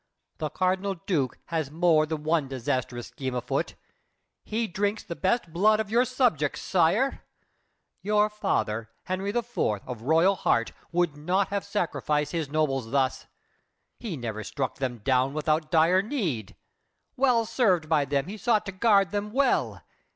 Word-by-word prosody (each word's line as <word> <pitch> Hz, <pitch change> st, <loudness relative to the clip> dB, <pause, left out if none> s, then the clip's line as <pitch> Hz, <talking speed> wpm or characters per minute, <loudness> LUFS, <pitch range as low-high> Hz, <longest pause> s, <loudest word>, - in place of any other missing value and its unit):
The 155 Hz, -, -2 dB
Cardinal 185 Hz, +4 st, 0 dB
Duke 145 Hz, -10 st, 0 dB
Has 160 Hz, -4 st, -1 dB
more 160 Hz, 0 st, +3 dB
than 155 Hz, -1 st, -4 dB
one 155 Hz, -2 st, +1 dB
disastrous 125 Hz, -2 st, -3 dB
scheme 130 Hz, -3 st, -4 dB
afoot. 125 Hz, 0 st, -2 dB, 0.7 s
He 225 Hz, +2 st, -1 dB
drinks 205 Hz, +3 st, -1 dB
the 170 Hz, -, -6 dB
best 190 Hz, -3 st, 0 dB
blood 215 Hz, +5 st, +4 dB
of 215 Hz, -1 st, -3 dB
your 240 Hz, +3 st, +4 dB
subjects, 240 Hz, -, +1 dB
sire! 190 Hz, +10 st, +2 dB, 0.8 s
Your 210 Hz, +1 st, +3 dB
father, 115 Hz, -, -1 dB
Henry 185 Hz, +2 st, -2 dB
IV., 240 Hz, +2 st, -3 dB, 0.3 s
of 125 Hz, -3 st, -6 dB
royal 165 Hz, +9 st, +4 dB
heart, 115 Hz, -8 st, +1 dB, 0.2 s
Would 175 Hz, -3 st, +1 dB
not 180 Hz, +6 st, 0 dB
have 200 Hz, 0 st, -2 dB
sacrificed 160 Hz, -7 st, -1 dB
his 160 Hz, -5 st, -2 dB
nobles 135 Hz, -6 st, 0 dB
thus! 135 Hz, 0 st, 0 dB, 0.7 s
He 205 Hz, -10 st, -5 dB
never 110 Hz, -3 st, -4 dB
struck 120 Hz, +5 st, -3 dB
them 125 Hz, -4 st, -3 dB
down 130 Hz, +2 st, +2 dB
without 155 Hz, 0 st, 0 dB
dire 165 Hz, +4 st, +4 dB
need! 160 Hz, -, -3 dB, 0.6 s
Well 250 Hz, -3 st, +3 dB
served 185 Hz, -10 st, +2 dB
by 155 Hz, -3 st, +2 dB
them, 140 Hz, 0 st, 0 dB
he 205 Hz, +3 st, -6 dB
sought 220 Hz, -1 st, +1 dB
to 195 Hz, -, -4 dB
guard 195 Hz, 0 st, +3 dB
them 205 Hz, 0 st, -2 dB
well. 270 Hz, +3 st, +1 dB
170 Hz, 150 wpm, -27 LUFS, 140-205 Hz, 0.8 s, blood